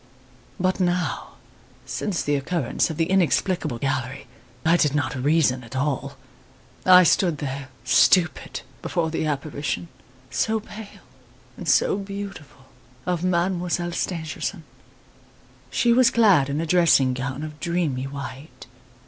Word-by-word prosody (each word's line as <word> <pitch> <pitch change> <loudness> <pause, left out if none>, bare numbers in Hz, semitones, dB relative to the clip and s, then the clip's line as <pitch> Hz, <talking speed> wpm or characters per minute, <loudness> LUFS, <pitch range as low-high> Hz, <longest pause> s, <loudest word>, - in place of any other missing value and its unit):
"But 185 +1 0
now, 180 -1 -1 0.5
since 195 -5 -2
the 145 - 0
occurrence 140 -1 0
of 160 - -5
the 165 - +2
inexplicable 180 -5 +1
gallery, 130 +1 -3 0.4
I 165 +2 +5
did 150 -4 +2
not 145 - 0
reason 135 -1 +2
at 115 +2 -11
all. 140 0 -2 0.7
I 185 0 +9
stood 170 -1 +3
there, 135 -1 -5 0.2
stupid, 160 +6 +3 0.2
before 165 -2 -1
the 160 -1 -1
apparition 145 +3 -3 0.4
so 220 0 0
pale 215 -1 -11 0.5
and - - -5
so - - +3
beautiful 195 -9 -8 0.4
of 180 -1 -1
Mademoiselle 175 -1 0
Stangerson. 165 +1 -3 1.1
She 240 -1 +2
was 250 0 +5
clad 195 -12 +4
in 140 +2 -1
a 165 - -1
dressing 160 -6 +4
gown 135 +3 -4
of 150 -1 -8
dreamy 165 -7 -1
white. 135 -1 -8
160 Hz, 125 wpm, -24 LUFS, 140-180 Hz, 1.1 s, I